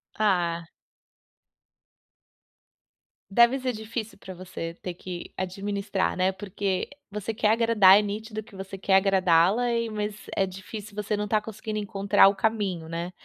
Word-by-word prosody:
Ah. 175 Hz, -5 st, +1 dB, 2.6 s
Deve 235 Hz, +5 st, +5 dB
ser 255 Hz, -1 st, -2 dB
difícil 220 Hz, 0 st, -6 dB
para 190 Hz, -1 st, -9 dB
você 180 Hz, -2 st, -6 dB
ter 180 Hz, -, -4 dB
que 175 Hz, 0 st, -8 dB
administrar, 195 Hz, +1 st, -2 dB
né, 185 Hz, +1 st, +2 dB
porque 195 Hz, -1 st, -3 dB, 0.2 s
você 210 Hz, +2 st, -4 dB
quer 210 Hz, 0 st, +1 dB
agradar, 220 Hz, -4 st, +6 dB
é -, -, +2 dB
nítido 215 Hz, +1 st, -4 dB
que 205 Hz, -2 st, -16 dB
você 195 Hz, 0 st, -7 dB
quer 190 Hz, 0 st, +2 dB
agradá-la 190 Hz, +3 st, +4 dB
e, 230 Hz, -1 st, 0 dB
mas 210 Hz, -1 st, -3 dB, 0.2 s
é 195 Hz, -, +2 dB
difícil 200 Hz, +2 st, -9 dB
você 210 Hz, 0 st, -2 dB
não 210 Hz, -, -1 dB
está 210 Hz, +1 st, +1 dB
conseguindo 215 Hz, 0 st, -6 dB
encontrar 200 Hz, -1 st, +4 dB
o 200 Hz, -, -2 dB
caminho, 200 Hz, -7 st, -1 dB
né. 170 Hz, +2 st, -4 dB
200 Hz, 145 wpm, -26 LUFS, 185-215 Hz, 2.6 s, agradar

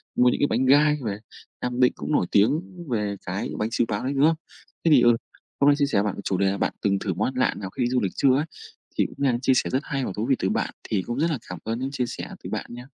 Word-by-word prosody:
mua 125 Hz, 0 st, +5 dB
những -, -, -1 dB
cái 145 Hz, -, +4 dB
bánh 125 Hz, +4 st, +1 dB
gai 150 Hz, +3 st, +5 dB
về. 100 Hz, -2 st, -2 dB, 0.4 s
Nam 125 Hz, 0 st, -2 dB
Định 125 Hz, -, +5 dB
cũng -, -, -5 dB
nổi 120 Hz, -, +3 dB
tiếng 110 Hz, -, +4 dB, 0.3 s
về 105 Hz, -3 st, -1 dB
cái 95 Hz, +3 st, -3 dB
bánh 110 Hz, +1 st, 0 dB
xíu 120 Hz, -, +2 dB
páo 105 Hz, +3 st, -2 dB
đấy, 135 Hz, +2 st, -1 dB
đúng 140 Hz, +1 st, +2 dB
không? 160 Hz, 0 st, +4 dB, 0.5 s
Thế 165 Hz, -, +4 dB
thì, 135 Hz, -5 st, +7 dB
ừ, 120 Hz, -1 st, +5 dB, 0.4 s
hôm 140 Hz, -, +4 dB
nay 145 Hz, -, +5 dB
chia 145 Hz, -, +3 dB
sẻ 140 Hz, -, 0 dB
với 100 Hz, -, +3 dB
bạn 105 Hz, -, -1 dB
về -, -, -7 dB
chủ 95 Hz, -, 0 dB
đề 95 Hz, 0 st, +2 dB
là 100 Hz, -, -2 dB
bạn -, -, 0 dB
từng 100 Hz, -1 st, +1 dB
thử 95 Hz, -, -2 dB
món -, -, 0 dB
ăn 130 Hz, -, -4 dB
lạ 130 Hz, -, +2 dB
nào 95 Hz, -2 st, -5 dB
khi 120 Hz, +4 st, -1 dB
du 125 Hz, 0 st, +2 dB
lịch 95 Hz, -, -1 dB
chưa 130 Hz, -1 st, +4 dB
ấy, 150 Hz, +3 st, +1 dB, 0.5 s
thì -, -, +3 dB
cũng -, -, -8 dB
đang 125 Hz, -2 st, +2 dB
chia 130 Hz, -, +3 dB
sẻ -, -, +1 dB
rất 130 Hz, -, +1 dB
hay 135 Hz, -2 st, -2 dB
và -, -, -3 dB
thú 105 Hz, +2 st, -2 dB
vị 135 Hz, -, +5 dB
từ 95 Hz, -, 0 dB
bạn. -, -, -1 dB, 0.2 s
Thì 100 Hz, -3 st, +1 dB
cũng 120 Hz, +7 st, -4 dB
rất 165 Hz, +1 st, +2 dB
là 145 Hz, -, 0 dB
cảm 90 Hz, -, -6 dB
ơn 115 Hz, +2 st, -3 dB
những 135 Hz, +1 st, -3 dB
chia 125 Hz, -3 st, -1 dB
sẻ -, -, -6 dB
từ -, -, -6 dB
bạn -, -, -3 dB
nha. 125 Hz, +1 st, -8 dB
125 Hz, 315 wpm, -25 LUFS, 105-135 Hz, 0.5 s, thì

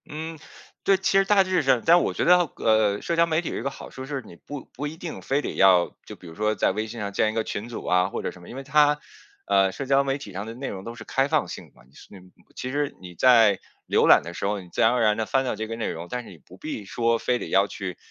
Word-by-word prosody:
嗯， 160 Hz, +1 st, -6 dB, 0.4 s
对。 195 Hz, -, +4 dB
其 195 Hz, +1 st, +1 dB
实 195 Hz, -, +2 dB
大 195 Hz, -1 st, +5 dB
致 185 Hz, -1 st, +1 dB
上 130 Hz, -4 st, +2 dB
但 175 Hz, +1 st, +6 dB
我 -, -, -1 dB
觉 -, -, -1 dB
得， 180 Hz, +1 st, +7 dB, 0.2 s
呃， 110 Hz, -2 st, +2 dB
社 170 Hz, -, -2 dB
交 165 Hz, 0 st, +4 dB
媒 160 Hz, 0 st, +1 dB
体 175 Hz, -, -5 dB
有 -, -, -4 dB
一 -, -, -4 dB
个 135 Hz, -, -2 dB
好 -, -, -10 dB
处 130 Hz, -, -8 dB
是， 135 Hz, -1 st, -4 dB
你 85 Hz, -, -13 dB
不 145 Hz, +10 st, -9 dB
不 145 Hz, +3 st, -4 dB
一 155 Hz, +2 st, -8 dB
定 170 Hz, -1 st, -7 dB
非 140 Hz, +2 st, 0 dB
得 -, -, -4 dB
要 95 Hz, -2 st, +4 dB
就 -, -, -9 dB
比 -, -, -17 dB
如 80 Hz, -, -10 dB
说 105 Hz, +4 st, 0 dB
在 -, -, +2 dB
微 110 Hz, +3 st, -3 dB
信 115 Hz, +1 st, -8 dB
上 100 Hz, -1 st, -4 dB
建 110 Hz, +2 st, +2 dB
一 -, -, -9 dB
个 115 Hz, -, 0 dB
群 110 Hz, +2 st, -5 dB
组 120 Hz, -, -7 dB
啊 90 Hz, +1 st, +2 dB
或 -, -, -4 dB
者 -, -, -2 dB
什 90 Hz, -, -15 dB
么。 85 Hz, -, -13 dB
因 -, -, -9 dB
为 135 Hz, -, -6 dB
它 150 Hz, +1 st, +3 dB, 0.5 s
呃， 95 Hz, -1 st, +3 dB
社 135 Hz, +8 st, -6 dB
交 135 Hz, +1 st, +3 dB
媒 135 Hz, 0 st, -1 dB
体 105 Hz, -8 st, -10 dB
上 100 Hz, +3 st, -5 dB
的 115 Hz, -, -6 dB
内 135 Hz, +2 st, -5 dB
容 95 Hz, -1 st, -7 dB
都 115 Hz, +2 st, -7 dB
是 -, -, -10 dB
开 135 Hz, +1 st, 0 dB
放 155 Hz, +1 st, +1 dB
性 -, -, -8 dB
的 -, -, -35 dB
嘛， -, -, -20 dB, 0.3 s
那 100 Hz, -, -12 dB
种 90 Hz, 0 st, -19 dB, 0.2 s
其 130 Hz, -, -5 dB
实 145 Hz, +1 st, -2 dB
你 90 Hz, -1 st, -11 dB
在 115 Hz, -3 st, +5 dB, 0.3 s
浏 -, -, +3 dB
览 -, -, +7 dB
的 85 Hz, -, -8 dB
时 -, -, -4 dB
候， 100 Hz, 0 st, -1 dB
你 90 Hz, -2 st, -12 dB
自 -, -, -2 dB
然 115 Hz, -, +5 dB
而 125 Hz, -1 st, +1 dB
然 105 Hz, -1 st, +3 dB
地 110 Hz, -, -1 dB
翻 135 Hz, +4 st, +1 dB
到 125 Hz, -, -1 dB
这 110 Hz, +1 st, -4 dB
个 115 Hz, -, -5 dB
内 115 Hz, -, -3 dB
容， 85 Hz, +2 st, -6 dB
但 125 Hz, 0 st, -4 dB
是 -, -, -13 dB
你 90 Hz, -, -13 dB
不 -, -, -17 dB
必 105 Hz, -, -6 dB
说 115 Hz, +3 st, +1 dB
非 125 Hz, +1 st, 0 dB
得 -, -, -6 dB
要 100 Hz, +1 st, +3 dB
去， 95 Hz, -3 st, -6 dB
115 Hz, 330 characters per minute, -25 LUFS, 100-145 Hz, 0.5 s, 得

